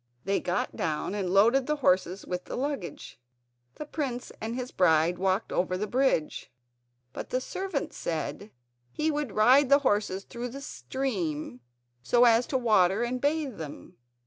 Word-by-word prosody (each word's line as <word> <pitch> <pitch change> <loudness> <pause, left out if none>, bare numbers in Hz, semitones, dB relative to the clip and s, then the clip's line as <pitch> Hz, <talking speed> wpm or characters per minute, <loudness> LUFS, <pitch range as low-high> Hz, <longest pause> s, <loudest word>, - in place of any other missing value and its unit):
They 195 +1 +1
got 180 0 -2
down 160 +3 -2
and 200 -3 -2
loaded 230 +8 +4
the 300 - +1
horses 185 - +1
with 180 0 -4
the - - -6
luggage. 270 - -4 0.6
The 300 - -6
prince 270 -5 -4
and 225 +2 -3
his 255 0 -4
bride 170 0 +3
walked 190 +2 0
over 185 0 0
the 210 - -2
bridge, 230 - 0 0.6
but - - -6
the 255 - 0
servant 370 +2 -4
said 170 +5 -4 0.4
he 310 - 0
would 295 -7 -3
ride 255 +6 +5
the 280 - +7
horses 205 -3 +1
through 240 +2 -6
the 275 +3 -8
stream 175 - -3 0.4
so 240 - +3
as 235 +1 +4
to 265 - 0
water 215 -3 +3
and 245 +1 -2
bathe 290 - -1
them. 150 -3 -9
225 Hz, 160 wpm, -28 LUFS, 185-265 Hz, 0.6 s, the